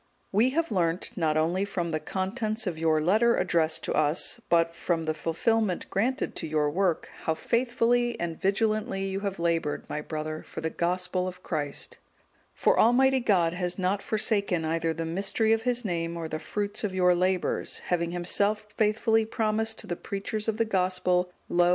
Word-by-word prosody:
_ - - -40 0.3
We 220 +6 +4
have 330 +5 -1
learnt 180 +3 0
not 160 -5 +1
only 170 +5 +1
from 180 -4 -2
the 155 - 0
contents 215 +7 -2
of 170 -4 -3
your 160 -1 +3
letter 215 +9 +3
addressed 160 -2 +2
to - - -1
us, 155 +10 +2
but 165 -1 +3
from 170 -1 -1
the 155 0 -1
fulfilment 185 +5 0
granted 245 +7 0
to 165 - -4
your 150 -1 +1
work, 180 0 0
how 160 - +1
faithfully 240 +4 +1
and 170 -1 -4
vigilantly 215 +1 0
you 195 0 -2
have 200 -1 -3
laboured, 165 -3 -1
my 150 - -3
brother, 155 0 -4
for - - -9
the 160 0 -2
Gospel 180 +1 -1
of 180 0 -8
Christ; 145 -4 -3 0.6
for - - +3
Almighty 265 +3 +5
God 180 -8 +2
has 180 0 -2
not 190 +1 0
forsaken 200 -6 0
either 165 +1 0
the 165 +1 -3
mystery 195 +6 +1
of 225 +2 0
His 245 -1 -1
Name, 170 -2 -2
or 165 -1 -4
the 155 0 -4
fruit 205 +7 -3
of 195 -3 -2
your 180 -1 +4
labours, 185 +1 0
having 170 -1 +1
Himself 205 +4 0
faithfully 220 +1 +2
promised 220 0 0
to - - -4
the 175 - -3
preachers 200 +4 -4
of 220 -1 0
the 230 - +2
Gospel, 180 -2 +1 0.2
'Lo! 175 0 +3
185 Hz, 180 wpm, -27 LUFS, 165-215 Hz, 0.6 s, Almighty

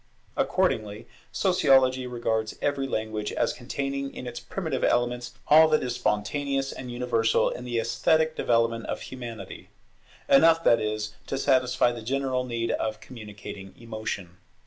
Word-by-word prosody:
Accordingly, 105 0 0 0.2
Sociology 135 -8 +3
regards 110 -3 -2
every 140 -1 -1
language 110 -3 -3
as - - 0
containing 140 +2 -4
in - - -7
its 120 -1 -5
primitive 160 0 -4
elements 120 0 +1
all 160 +2 +8
that 155 -1 +2
is 125 -1 -2
spontaneous 135 +4 -1
and 125 -1 -7
universal 120 -2 +1
in 125 - -7
the 120 -1 -2
esthetic 160 +7 +2
development 115 -1 +1
of - - -3
Humanity; 120 -3 -8 0.6
enough, 165 +4 +6
that 115 - +5
is, 110 0 -2
to 135 - -2
satisfy 130 -3 +3
the 120 -1 -7
general 130 +1 -1
need 115 -2 -2
of 110 -1 -2
communicating 105 -4 -10
emotion. 110 -6 -6
120 Hz, 140 wpm, -26 LUFS, 115-135 Hz, 0.6 s, all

